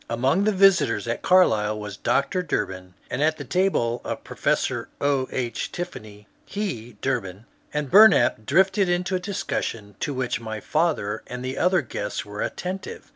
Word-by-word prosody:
Among 130 - +1
the 215 - +3
visitors 185 - +3
at 115 - -2
Carlisle 110 - +3
was 105 -1 -6
Dr. 140 - 0
Durbin, 95 - -3 0.2
and 125 - -2
at 155 +1 +2
the 145 - -6
table 140 -8 0
of - - -5
Professor - - -1
O. 140 -2 +1
H. 120 -2 -3
Tiffany 105 -12 -7 0.2
he 125 - -5
(Durbin) 110 -6 -2 0.3
and 150 -2 -3
Bumap 190 - +6
drifted 190 +5 +3
into 180 +2 0
a - - 0
discussion 115 - -4
to - - -2
which 130 -4 -2
my 110 -1 -5
father 150 -9 0
and 125 +1 -6
other 180 0 +3
guests 105 -4 -4
were 105 0 -6
attentive. 190 - -5
135 Hz, 155 wpm, -24 LUFS, 110-180 Hz, 0.3 s, Bumap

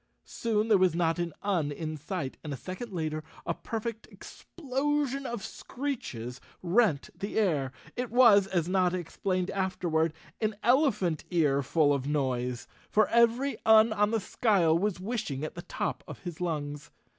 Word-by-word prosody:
Soon 220 -2 -1
there 210 -4 +5
was 185 -3 +3
not 170 0 +1
an 175 -1 -1
Un 175 -8 0
in 155 +1 -4
sight 155 -2 -4
and 150 - -5
a 140 - -3
second 185 - -7
later 155 -3 -3 0.2
a - - 0
perfect 225 0 -5
explosion 275 -2 -3
of 235 -4 -4
screeches 130 - -5 0.2
rent 180 - +2
the 200 +2 -5
air!§| 155 -11 +1 0.2
It 250 -1 -3
was, 225 -5 +6
as 175 -4 0
Notta 185 -1 +2
explained 185 +2 -2
afterward, 175 -4 0 0.3
an 215 -1 0
elephant 230 - +2
ear 150 -6 +2
full 145 +1 +3
of 140 -1 -2
noise, 125 -4 -1 0.2
for 215 0 +3
every 235 +2 +3
Un 220 0 +6
on 210 -1 +2
the 225 0 +1
skyle 195 -6 +2
was 190 +1 0
wishing 190 - -3
at 155 - -4
the 175 - -7
top - - -3
of - - -8
his 175 -2 -6
lungs. 150 -3 -3
185 Hz, 160 wpm, -29 LUFS, 155-225 Hz, 0.3 s, was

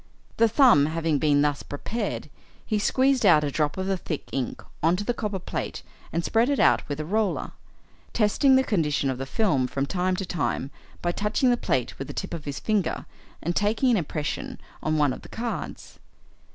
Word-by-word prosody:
The 230 - +5
thumb 230 - +6
having 160 -2 0
been 145 -1 +3
thus 145 -1 0
prepared, 215 +11 -4 0.4
he 215 -2 0
squeezed 260 +4 +2
out 170 -7 +6
a 145 - -1
drop 150 +2 0
of 190 - -2
the 195 0 0
thick 155 -4 -5
ink 130 -3 -3 0.2
on 165 +3 +3
to 200 - -3
the 240 - 0
copper 210 -4 -3
plate 185 - -5 0.3
and 170 +1 -1
spread 230 +3 +2
it 285 - +1
out - - +5
with 145 - -2
the 155 - -4
roller, 210 +4 0 0.6
testing 240 +5 +3
the 265 - +5
condition 150 - +1
of 130 - -5
the 135 - -4
film 135 - +1
from 135 +2 -2
time 185 +3 0
to 190 - -3
time 145 -5 -2 0.3
by 175 - +1
touching 210 +7 +1
the - - +4
plate 130 - -1
with 135 - -4
the - - -8
tip - - -4
of 165 -3 -6
his 140 -2 -4
finger 210 -5 -1 0.4
and 175 +2 -1
taking 220 +5 +2
an 230 - +4
impression 155 -3 -3 0.2
on 155 0 0
one 145 -3 +3
of - - -9
the - - -13
cards. 235 +1 -5
175 Hz, 205 wpm, -26 LUFS, 145-220 Hz, 0.6 s, thumb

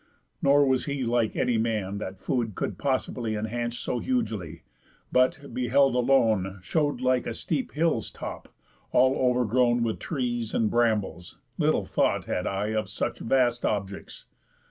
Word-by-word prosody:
Nor 140 +1 +5
was 130 -1 +1
he 140 -2 -2
Like 120 -2 +1
any 120 -2 +1
man 105 -3 -1
that 95 -2 -6
food 110 +1 -2
could - - -3
possibly 125 -4 -1
Enhance 120 +3 -3
so 125 - -2
hugely, 105 - -2 0.5
but, 130 +3 +1
beheld 130 +2 +3
alone, 115 -7 +2
Show'd 145 - 0
like 130 -1 +1
a 115 - -3
steep 145 0 -3
hill's 155 -7 +1
top, - - -8 0.4
all 130 +1 +4
overgrown 125 -1 +2
With 115 -2 -2
trees 120 -6 -2
and 110 -2 +1
brambles; 110 -7 0 0.2
little - - +2
thought - - +1
had 90 - -2
I 100 +2 -1
Of 110 -2 -1
such 100 - -3
vast 120 -1 +1
objects. 100 -2 -3
120 Hz, 145 wpm, -27 LUFS, 110-130 Hz, 0.5 s, Nor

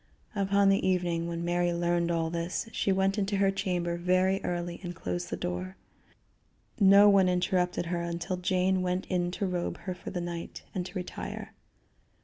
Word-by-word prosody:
Upon 200 0 +3
the 195 - +3
evening 175 -2 0
when 170 0 -3
Mary 175 0 +1
learned 170 0 +1
all 165 -1 0
this, 170 +5 -2
she 200 - 0
went 195 +2 +2
into 200 0 0
her 195 0 +3
chamber 175 -3 -1
very 185 +2 +2
early 175 0 -3
and 175 -2 -6
closed 90 - -4
the - - -3
door. 90 +1 -4 1.0
No 200 +1 +8
one 195 -2 +5
interrupted 180 0 +1
her 170 0 -2
until 170 +2 -3
Jane 185 +1 +1
went 180 +1 -1
in 175 -1 +1
to 190 +3 -2
robe 180 -2 -2
her 185 - -4
for 180 - -8
the 180 - -3
night, 170 -1 -6
and 180 -2 -2
to 180 - -12
retire. 60 - -6
180 Hz, 175 wpm, -29 LUFS, 170-190 Hz, 1.0 s, No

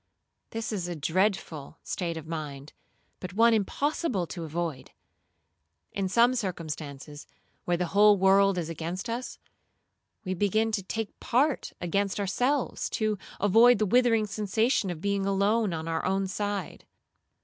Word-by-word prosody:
This 225 0 -4
is 185 -5 -2
a 175 - -4
dreadful 160 -2 -1
state 170 -3 -3
of 160 - -7
mind, 150 -3 -6 0.5
but 180 -1 -7
one 230 +2 +5
impossible 225 - 0
to 170 0 -7
avoid. 160 -3 -4 1.0
In 195 -2 -2
some 235 +5 +4
circumstances, 155 - -5 0.4
where 175 -1 +1
the 180 - 0
whole 205 0 +6
world 195 0 +4
is 170 -3 -2
against 170 +7 -4
us, 245 +2 -5 0.9
we 185 - -1
begin 210 +4 +1
to 215 -2 -1
take 220 +2 -4
its - - -38
part 270 +4 +1
against 195 +3 -1
ourselves, 245 +8 0
to 215 -2 -1 0.2
avoid 225 +5 +6
the 215 - +1
withering 230 0 +3
sensation 210 +2 0
of 170 -3 -5
being 200 0 0
alone 200 +2 +2
on 160 -1 -4
our 165 0 -1
own 195 +1 0
side. 205 -1 -4
195 Hz, 145 wpm, -28 LUFS, 170-220 Hz, 1.0 s, whole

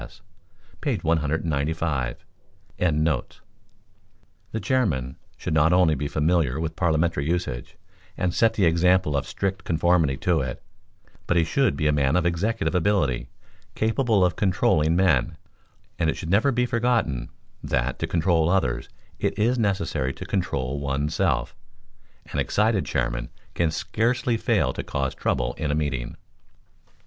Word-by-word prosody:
S.," - - -13 0.6
page - - -1
195.]] 80 -3 0 0.6
The 80 +6 -4
chairman 80 - 0 0.2
should - - -3
not 80 +1 +4
only 90 -3 +4
be 75 -1 -2
familiar 75 -2 +1
with 80 -1 -3
parliamentary 80 -4 +1
usage, 85 -9 -3 0.4
and 90 -1 0
set 115 -1 +3
the 100 - +3
example 85 -1 +3
of 70 - -1
strict 95 -1 -3
conformity 80 -4 +2
to 85 +1 +1
it, 65 -2 -5 0.6
but 85 - +2
he 85 - +4
should 115 - +1
be 75 - +1
aman 75 -1 +2
of 90 -1 +2
executive 85 -1 0
ability, 90 -8 +1 0.5
capable 110 -3 +2
of 90 - 0
controlling 90 -5 +2
men; 85 -8 +2 0.6
and 80 -2 +2
it - - -2
should 85 -1 -5
never 110 +8 +4
be 125 0 +1
forgotten, 115 - 0 0.3
that, 65 0 -1
to - - -1
control 85 -1 +2
others, 75 -9 0 0.3
it - - -1
is 120 +4 +2
necessary 95 - 0
to - - -8
control 70 -8 -2
one's 70 +2 -2
self. - - 0 0.8
An - - -1
excited 105 -6 +1
chairman - - -2 0.2
can 85 - +1
scarcely 115 +8 0
fail 115 - +1
to - - -4
cause 70 -1 -2
trouble - - -1
in 75 - -1
a 75 - +1
meeting. 65 -6 -3
80 Hz, 140 wpm, -24 LUFS, 70-95 Hz, 0.8 s, not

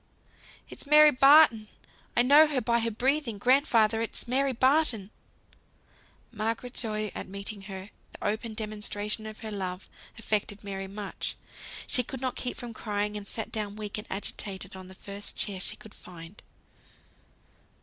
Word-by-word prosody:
"It's - - -9
Mary 300 +1 +8
Barton! 275 -5 +6 0.5
I 240 - +6
know 290 +5 +7
her 290 -3 0
by 235 0 +1
her 230 0 0
breathing! 250 +1 0
Grandfather, 230 -2 +3
it's 230 - -4
Mary 270 +2 +2
Barton!" 255 -5 +2 1.2
Margaret's 230 +3 -3
joy 215 -3 -2
at - - -6
meeting 200 +1 -6
her, 190 +1 -8 0.2
the - - -9
open 220 +1 -2
demonstration 215 0 -3
of 215 0 -10
her 220 - -6
love, 185 -2 -5 0.3
affected 210 -2 -1
Mary 195 -1 -5
much; 200 +1 -5 0.5
she 250 - +4
could 260 +2 -6
not 255 0 -2
keep 250 - -3
from 240 -1 -6
crying, 210 -1 -2
and 205 -1 -6
sat 220 +1 -4
down 210 -2 -3
weak 210 -1 -4
and 210 - -9
agitated 195 0 -5
on 185 -1 -10
the 190 - -13
first 200 +1 -5
chair 195 -2 -2
she - - -5
could 215 - -14
find. 175 +2 -12
215 Hz, 155 wpm, -28 LUFS, 205-245 Hz, 1.2 s, Mary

